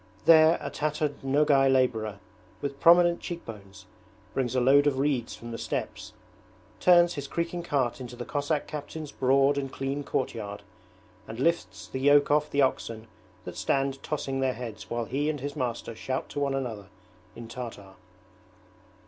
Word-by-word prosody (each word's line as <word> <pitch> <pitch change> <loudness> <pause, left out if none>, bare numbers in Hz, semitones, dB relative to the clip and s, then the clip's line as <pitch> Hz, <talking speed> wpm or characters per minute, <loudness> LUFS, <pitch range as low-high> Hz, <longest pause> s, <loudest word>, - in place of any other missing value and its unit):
There 160 0 +7
a - - -5
tattered 150 -1 -2
Nogay 135 0 +4
labourer, 115 -6 +1 0.4
with 140 -1 -5
prominent 175 0 +6
cheekbones, 100 - -8 0.5
brings 130 -2 -1
a - - +3
load 140 +3 +5
of 140 -2 +1
reeds 135 -4 0
from 120 0 -9
the 115 - -5
steppes, - - -4 0.7
turns 175 -1 +5
his 145 -3 -5
creaking 170 +3 -3
cart 135 -7 -1
into 125 -1 -7
the 120 - -6
Cossack 145 +1 -1
captain's 150 0 -7
broad 135 +2 +3
and 135 -1 -5
clean 135 +2 -3
courtyard, 105 -7 -3 0.6
and 110 +1 -7
lifts 170 +5 -1
the 130 - -5
yoke 145 +1 +5
off 150 0 +3
the 140 0 +2
oxen 115 -4 -2 0.4
that 90 - -7
stand 135 0 0
tossing 135 -3 -3
their 130 -1 +1
heads 110 -3 -8
while 120 0 -2
he 145 +5 -1
and 150 -2 -2
his 145 +3 -5
master 120 -4 -3
shout 130 +3 -4
to - - -4
one 140 -1 0
another 115 -7 -4 0.5
in 115 -1 -9
Tartar. 115 -5 -8
135 Hz, 160 wpm, -27 LUFS, 120-145 Hz, 0.7 s, There